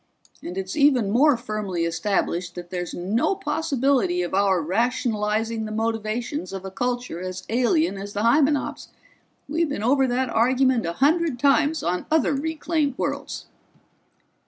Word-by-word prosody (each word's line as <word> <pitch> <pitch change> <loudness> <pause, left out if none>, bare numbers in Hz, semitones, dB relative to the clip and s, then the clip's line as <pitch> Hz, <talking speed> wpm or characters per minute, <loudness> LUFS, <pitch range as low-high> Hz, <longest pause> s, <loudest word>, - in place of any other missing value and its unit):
And 180 +2 -7
it's 190 0 -4
even 265 -8 +3
more 270 +4 +4
firmly 210 -7 -3
established 175 0 -1
that 175 -1 -8
there's 175 -2 -3
no 215 - 0
possibility 275 - 0
of 175 - -5
our 195 -1 +3
rationalizing 220 +3 0
the 215 - -6
motivations 225 +1 -2
of 195 0 -6
a 190 - -6
culture 245 -4 -3
as 185 0 -5
alien 250 - +1
as 200 +1 -7
the 205 - -2
Hymenops' 285 +4 +2 0.6
we've 320 +2 0
been 280 -7 -3
over 265 +3 +3
that 250 0 -1
argument 250 -2 +2
a 170 - -2
hundred 300 - +2
times 290 +4 +2
on 180 +1 -2
other 315 -1 +2
reclaimed 305 -1 -1
worlds." - - -3
230 Hz, 145 wpm, -24 LUFS, 195-280 Hz, 0.6 s, more